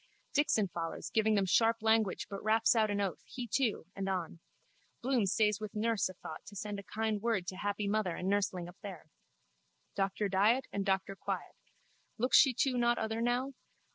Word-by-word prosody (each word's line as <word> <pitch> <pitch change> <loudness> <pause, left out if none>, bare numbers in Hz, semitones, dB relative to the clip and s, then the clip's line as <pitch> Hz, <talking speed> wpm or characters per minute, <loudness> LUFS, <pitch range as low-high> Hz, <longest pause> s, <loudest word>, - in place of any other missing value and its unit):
Dixon 250 -8 +2
follows 170 -2 -5
giving 220 -1 +3
them 200 -1 +2
sharp 225 +4 +3
language 220 -3 +2
but 200 -1 -7
raps 220 +2 +4
out 220 -2 +3
an 205 0 -1
oath, 195 -3 -2
he 250 - -6
too, 230 -5 0
and 195 0 -3
on. 175 -3 -3 0.6
Bloom 245 -5 +2
stays 210 +1 +2
with 215 -1 -7
nurse 220 -2 +1
a 185 - -10
thought - - -9
to 205 - -10
send 205 0 -4
a - - -8
kind 220 -1 0
word 220 -5 0
to 185 - -5
happy 205 +1 -2
mother 200 -4 0
and 180 - -4
nurseling 190 -3 0
up 175 +2 -12
there. 185 -6 -9 0.8
Doctor 195 +1 0
Diet 210 +7 +3
and 200 0 -2
Doctor 195 0 0
Quiet. - - -4 0.6
Looks 250 +3 +5
she 270 - +6
too 250 0 +1
not 240 0 +3
other 220 +1 -2
now? 245 +3 0
210 Hz, 190 wpm, -33 LUFS, 195-225 Hz, 0.8 s, she